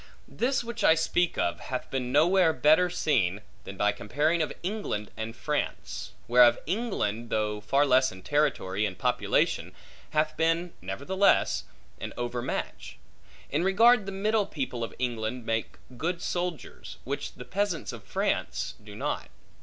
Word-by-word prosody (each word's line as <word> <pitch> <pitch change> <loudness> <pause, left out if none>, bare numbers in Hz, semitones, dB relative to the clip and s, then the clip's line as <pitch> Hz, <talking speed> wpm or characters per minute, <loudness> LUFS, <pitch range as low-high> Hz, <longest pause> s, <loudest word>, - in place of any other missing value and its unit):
This 255 +1 0
which 235 -2 -5
I 160 - +7
speak 175 +2 +1
of, 85 - 0
hath 130 -1 -5
been 125 -2 -2
nowhere 165 +4 +4
better 160 +4 +4
seen, 110 - +1 0.2
than 95 - -8
by 105 +1 +3
comparing 150 +11 0
of 155 - -1
England 180 - -3
and 110 +1 -5
France; 150 +5 -3
whereof 120 0 +6
England, 150 - -2
though 105 -1 -1
far 135 +7 +3
less 130 -1 +4
in 95 0 -12
territory 135 -10 +1
and 90 -2 -7
population, - - +1 0.3
hath 155 0 +1
been 165 +2 +1
(nevertheless) 140 - +2 0.3
an - - -6
overmatch; 120 0 -4 0.5
in 150 +4 +1
regard 215 +3 +5
the - - -3
middle 210 +2 +1
people 130 -5 -3
of 115 - -5
England 120 -1 -2
make 115 0 -2 0.2
good 170 +6 -2
soldiers, 175 -2 -4
which - - -4
the 125 - -10
peasants 185 +2 -2
of - - -9
France - - -1
do - - -11
not. - - -3
150 Hz, 145 wpm, -28 LUFS, 115-180 Hz, 0.5 s, I